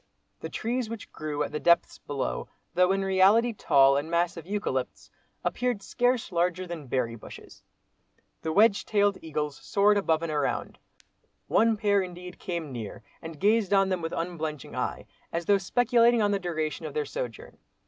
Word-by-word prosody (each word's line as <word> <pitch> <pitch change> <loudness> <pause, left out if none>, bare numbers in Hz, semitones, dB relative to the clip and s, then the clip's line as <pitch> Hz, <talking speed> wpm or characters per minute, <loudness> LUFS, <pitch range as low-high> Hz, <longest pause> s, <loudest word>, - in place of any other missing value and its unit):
The - - -6
trees 240 0 -2
which 230 -2 -8
grew 150 -1 -3
at - - -5
the 150 - -3
depths 170 +1 +3
below, 130 - -3 0.3
though 180 +1 +4
in 195 0 0
reality 195 +5 +4
tall 140 -8 +4
and 145 +3 -3
massive 170 -1 -1
eucalypts, 205 +1 -3 0.3
appeared 245 -5 -1
scarce 245 +1 0
larger 180 +1 0
than 170 -5 -7
berry 120 -2 -1
bushes. 110 - -12 0.8
The 160 - -2
wedge 205 +4 +4
tailed 205 -2 +1
eagles 150 -2 -3
soared 205 +1 +2
above 165 -4 +1
and 165 - -2
around. 145 -2 -2 0.7
One 225 -1 +3
pair 205 -1 +2
indeed 180 -1 -8
came 170 -5 -4
near 115 -5 -7 0.2
and 160 -2 -9
gazed 210 -1 +2
on 195 -1 +4
them 185 -2 -1
with 165 - -3
unblenching 160 -4 -4
eye, - - -3 0.3
as 170 0 -3
though 200 +2 +4
speculating 235 +2 +3
on 205 - +2
the 200 - +1
duration 155 -3 -3
of 150 - -9
their 150 -1 0
sojourn. 120 -5 -6
180 Hz, 170 wpm, -27 LUFS, 155-205 Hz, 0.8 s, though